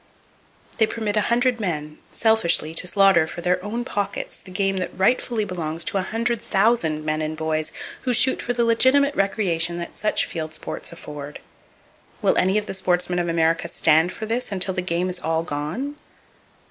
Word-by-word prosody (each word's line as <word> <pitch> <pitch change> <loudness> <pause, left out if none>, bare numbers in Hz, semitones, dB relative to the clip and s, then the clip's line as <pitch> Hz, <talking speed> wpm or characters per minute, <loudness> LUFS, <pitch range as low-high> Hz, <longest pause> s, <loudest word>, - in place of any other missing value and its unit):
They 220 - +5
permit 215 -2 -2
a 210 - +3
hundred 245 0 +2
men 155 -6 -3
selfishly 220 -8 +2
to 180 - +1
slaughter 180 -3 +4
for 175 - -7
their 180 +1 0
own 230 +4 -3
pockets 205 -4 -3
the - - -14
game 195 +1 0
that 185 - -4
rightfully 220 +2 +1
belongs 165 -3 -4
to 195 - 0
a - - +1
hundred 230 +4 -1
thousand 190 -8 +1
men 155 0 0
and 155 0 -3
boys 155 0 -1 0.3
who 255 - -1
shoot 255 +2 +3
for 245 - -2
the 235 -1 +1
legitimate 260 +5 +4
recreation 175 -5 +1
that 170 - -7
such 215 - +1
field 160 -2 -4
sports - - -6
afford. 150 -3 -8 0.8
Will - - +2
any 190 +3 +3
of 210 - -1
the - - -5
sportsmen 180 -1 +1
of 175 -1 -1
America 165 0 +1
"stand 160 +2 +3
for" 220 - -6
this 230 +1 -2
until 190 -1 +1
the 185 - -1
game 180 0 -1
is 180 -1 -3
all 160 -1 0
gone? 170 - -4
185 Hz, 185 wpm, -23 LUFS, 165-220 Hz, 0.8 s, They